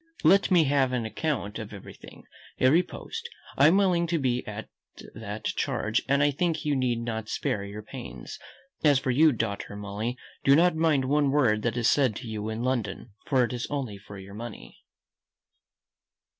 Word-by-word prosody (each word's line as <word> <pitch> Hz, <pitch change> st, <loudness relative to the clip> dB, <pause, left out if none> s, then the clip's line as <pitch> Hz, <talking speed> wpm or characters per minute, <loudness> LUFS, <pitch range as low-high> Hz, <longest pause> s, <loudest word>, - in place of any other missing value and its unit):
Let 195 Hz, +5 st, +5 dB
me 175 Hz, -4 st, +5 dB
have 135 Hz, -3 st, +2 dB
an 120 Hz, -3 st, -1 dB
account 115 Hz, -3 st, -2 dB
of 110 Hz, -2 st, -7 dB
everything, 100 Hz, -2 st, -12 dB, 0.4 s
every 140 Hz, +7 st, +5 dB
post; 460 Hz, -, -7 dB, 0.3 s
I 140 Hz, -, +6 dB
am 175 Hz, +5 st, +5 dB
willing 180 Hz, -4 st, +3 dB
to 170 Hz, 0 st, 0 dB
be 125 Hz, -4 st, 0 dB
at 105 Hz, +1 st, -6 dB, 0.5 s
that 105 Hz, 0 st, -7 dB
charge, -, -, 0 dB
and 140 Hz, +1 st, +3 dB
I 145 Hz, -, +4 dB
think 165 Hz, +3 st, -1 dB
you 145 Hz, -1 st, +1 dB
need 125 Hz, -3 st, 0 dB
not 110 Hz, -2 st, -4 dB
spare 100 Hz, -, -1 dB
your 100 Hz, +1 st, -7 dB
pains. 65 Hz, -, -9 dB, 0.4 s
As 145 Hz, -3 st, +5 dB
for 130 Hz, 0 st, 0 dB
you, 155 Hz, +5 st, +5 dB
daughter 105 Hz, -4 st, -3 dB
Molly, 105 Hz, +4 st, -4 dB, 0.3 s
do 140 Hz, -, +6 dB
not 175 Hz, +1 st, +4 dB
mind 155 Hz, -4 st, +2 dB
one 145 Hz, +1 st, +2 dB
word 125 Hz, -7 st, +3 dB
that 115 Hz, +1 st, -1 dB
is 120 Hz, -1 st, +2 dB
said 130 Hz, -7 st, +3 dB
to 125 Hz, -, -7 dB
you 110 Hz, -1 st, -4 dB
in 110 Hz, +2 st, -3 dB
London, 120 Hz, -3 st, -2 dB, 0.2 s
for 130 Hz, -3 st, +3 dB
it 120 Hz, -, -2 dB
is 120 Hz, 0 st, -3 dB
only 130 Hz, -9 st, -3 dB
for 100 Hz, 0 st, -11 dB
your 95 Hz, +1 st, -10 dB
money." 115 Hz, +2 st, -9 dB
125 Hz, 185 wpm, -27 LUFS, 110-145 Hz, 0.5 s, I